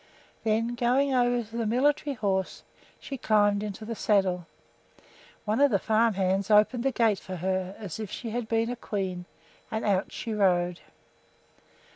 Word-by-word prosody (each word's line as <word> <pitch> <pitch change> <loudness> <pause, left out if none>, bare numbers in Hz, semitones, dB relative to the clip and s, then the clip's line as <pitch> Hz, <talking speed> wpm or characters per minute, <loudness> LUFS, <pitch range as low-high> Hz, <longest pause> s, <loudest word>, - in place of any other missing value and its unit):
Then, 225 +2 +1
going 255 +3 +2
over 245 -1 +2
to 225 - -12
the 230 -2 -1
military 280 +4 +1
horse, 195 -4 -2 0.4
she 275 -2 -7
climbed 205 -2 +3
into 210 +1 -6
the 230 - -4
saddle. 190 -5 +1 1.0
One 220 +5 +1
of 285 - +6
the 205 - +3
farm 220 +2 +2
hands 190 +1 0
opened 215 +3 +4
the 270 - +2
gate 225 -4 +2
for 185 - -7
her 185 +2 -2
as 205 -3 -7
if 215 -3 -5
she 230 +2 -6
had 240 0 -3
been 225 +1 0
a - - -3
queen, 190 -6 -4 0.4
and 220 - -3
out 195 -2 +1
she 225 - -5
rode. 180 -4 +2
215 Hz, 165 wpm, -27 LUFS, 195-235 Hz, 1.0 s, of